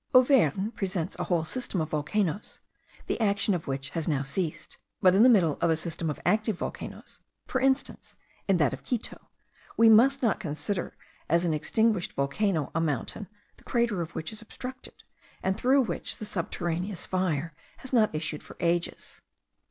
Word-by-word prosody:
Auvergne 225 - +4
presents 190 -4 -2
a - - -1
whole 170 -3 +1
system 245 -1 -2
of 155 -1 -1
volcanoes, 165 +5 -1 0.5
the - - -2
action 200 -1 +2
of 175 -3 -3
which 135 +1 -3
has 165 -1 -3
now 145 -4 +1
ceased; 155 +2 -3 0.2
but 185 -1 +5
in 195 - +5
the 250 - +8
middle 175 - +4
of - - +3
a 160 - +4
system 165 0 -3
of 150 - -4
active 215 +2 +2
volcanoes, - - -6 0.3
for 260 - -1
instance, 265 +1 0 0.3
in 195 -2 +4
that 150 -6 +2
of 135 +1 -7
Quito, 245 -3 -4 0.5
we 225 0 +7
must 265 +5 +6
not 225 - +2
consider 165 +1 -3 0.3
as 170 +1 +3
an 165 - +1
extinguished 210 +5 +1
volcano 150 +3 0
a 165 - +1
mountain, 165 - -2 0.3
the - - -20
crater 235 -7 0
of 170 0 -6
which 160 - -3
is 215 - -5
obstructed, 255 +3 -9 0.4
and 190 0 +1
through 260 +5 +3
which - - -3
the 215 - -5
subterraneous 175 0 -2
fire 170 -4 -1 0.2
has 260 -1 -11
not 220 -3 +5
issued 155 -1 -3
for - - -13
ages. 170 0 -1
185 Hz, 175 wpm, -28 LUFS, 160-220 Hz, 0.5 s, the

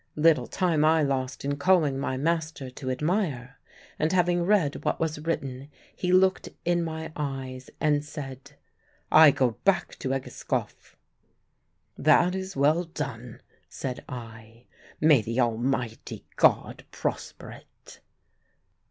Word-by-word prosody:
Little 160 +1 +3
time 170 -5 +1
I 160 0 +4
lost 130 -2 -2
in 140 0 -1
calling 150 -4 +3
my 130 -1 -2
master 160 -3 -2
to 130 +1 -6
admire, 145 - -2 0.4
and 155 +1 +1
having 175 -1 +2
read 175 -6 +1
what - - -1
was 160 -2 -2
written, 140 -4 -4 0.3
he 180 - -1
looked 185 +1 +3 0.2
in 175 0 +2
my 160 -1 -5
eyes 135 -3 -5
and 150 -1 +2
said, 135 -3 -9 0.6
"I 155 -1 +9
go 125 -4 +1
back 195 -1 +1
to 130 - -3
Egeskov." 135 -1 -4 1.0
"That 155 +4 +4
is 190 0 -5
well 150 +5 +3
done," 130 -7 -7 0.3
said 125 -2 -5
I; 115 -1 -10 0.3
"may 155 -5 +5
the 115 +4 -3
Almighty 120 0 -2
God - - +2
prosper - - -5
it!" - - -15
145 Hz, 125 wpm, -26 LUFS, 130-165 Hz, 1.0 s, I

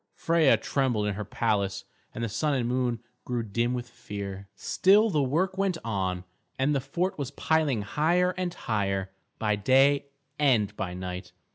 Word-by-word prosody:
Freia 165 -4 +4
trembled 125 -7 0
in 105 - 0
her 105 +2 -4
palace, 100 -2 -1 0.3
and 115 - -5
the - - 0
Sun 145 +7 0
and 120 -3 0
Moon 125 -2 0 0.2
grew 120 -2 -2
dim 115 +3 0
with 120 -1 -4
fear. 100 -4 -7
Still 205 - +4
the 150 - +2
work 170 +8 0
went 195 -3 +1
on, 95 -5 -2 0.3
and 135 +3 +2
the 135 - +1
fort 180 +7 -2
was 140 -3 -2
piling 145 -5 +1
higher 170 - +2
and 185 -1 -2
higher, 100 - -2 0.3
by 105 -1 +1
day 135 +6 +4 0.3
and 110 -8 +3
by 90 -3 -4
night. 90 0 -6
120 Hz, 165 wpm, -27 LUFS, 100-150 Hz, 0.3 s, Freia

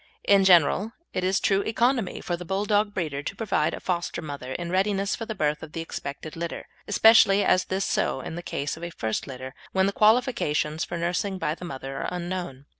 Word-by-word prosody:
In 200 -1 +5
general, 190 +5 +4 0.2
it 185 - -1
is 190 +1 +2
true 195 0 +2
economy 230 -1 0
for 175 - -2
the 175 - -8
Bulldog 205 +3 +1
breeder 155 -8 -3
to - - -5
provide 175 -8 0
a - - -8
foster 175 -2 -2
mother 140 -5 -6
in 175 -1 -4
readiness 195 +1 +1
for 225 - -6
the 220 - -4
birth 150 -4 0
of 160 -1 -10
the 165 - -3
expected 155 -1 -6
litter; 170 0 -5 0.2
especially 205 -1 +6
is 185 - +3
this 190 +1 -1
so - - 0
in 135 - -6
the 175 - -5
case 145 -4 -3
of 165 - -11
a 170 - -3
first 110 -9 -3
litter, 130 -1 -7 0.2
when 190 0 +3
the 200 - +1
qualifications 210 - +2
for 175 - -4
nursing 180 +3 -1
by 150 -4 -1
the 175 - -8
mother 135 -4 -6
are - - -2
unknown. 175 -6 -5
175 Hz, 210 wpm, -26 LUFS, 155-200 Hz, 0.2 s, especially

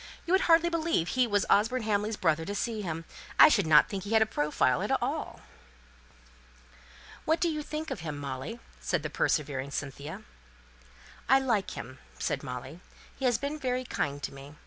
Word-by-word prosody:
You 350 - 0
would 380 - +5
hardly 335 +1 +6
believe 325 - 0
he 255 -1 +2
was 205 -3 +1
Osborne 225 +4 +3
Hamley's 210 0 0
brother 160 +1 +1
to 200 +5 -4
see 220 +1 -2
him! 165 -3 -4 0.3
I - - +10
should 200 - +2
not 150 -1 +7
think 195 -2 -4
he 205 +2 -4
has 220 - +5
a - - -2
profile 145 - +1
at - - -2
all." - - -3 1.8
"What 320 +1 +2
do 345 - +2
you 305 -2 -1
think 310 +1 -5
of - - -3
him, 155 -3 -5
Molly?" 140 - -5 0.2
said - - -1
the - - -4
persevering 140 -3 0
Cynthia. 140 +2 -6 1.1
"I 270 - +7
like 230 -7 0
him," 130 +1 -8 0.2
said - - -2
Molly. 130 +5 -7 0.4
"He 270 - -4
has 245 -3 +3
been 285 +5 -4
very 255 -2 -1
kind 145 - -3
to - - -4
me. 140 +2 -11
205 Hz, 185 wpm, -29 LUFS, -, 1.8 s, I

